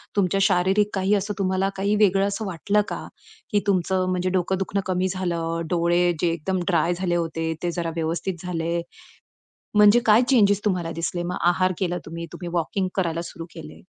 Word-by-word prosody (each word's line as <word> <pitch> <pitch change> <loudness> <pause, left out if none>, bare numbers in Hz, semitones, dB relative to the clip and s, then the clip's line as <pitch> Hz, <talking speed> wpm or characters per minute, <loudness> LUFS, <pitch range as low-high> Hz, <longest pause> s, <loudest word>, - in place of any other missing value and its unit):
तुमच्या 195 -1 +2
शारीरिक 195 +3 +3
काही 195 +1 +1
असं 205 +1 -1
तुम्हाला 190 0 +1
काही 200 +2 +1
वेगळं 200 -1 +3
असं 210 +2 -3
वाटलं 200 +3 +1
का? - - -5 0.4
की 205 - +3
तुमचं 185 -1 +1
म्हणजे 185 0 0
डोकं 185 0 0
दुखणं 195 +1 -1
कमी 185 0 0
झालं, 170 -3 -2
डोळे 175 0 +2
जे 175 - +2
एकदम 180 +3 -2
ड्राय 170 -1 +2
झाले 175 -1 -1
होते, 165 -1 -1
ते 175 - 0
जरा 170 -1 -2
व्यवस्थित 170 +2 -3
झाले. 170 -1 -1 0.9
म्हणजे 210 +3 +7
काय 220 +2 +6
चेंजस 205 -5 +4
तुम्हाला 180 -4 0
दिसले 170 +1 -3
मग 180 +1 -3
आहार 185 +1 +2
केला 180 -2 -1
तुम्ही, 170 +1 -6
तुम्ही 175 - -7
वॉकिंग 180 +3 -1
करायला 170 -3 0
सुरू 165 - -8
केले? 155 -2 -10
180 Hz, 175 wpm, -24 LUFS, 170-195 Hz, 0.9 s, म्हणजे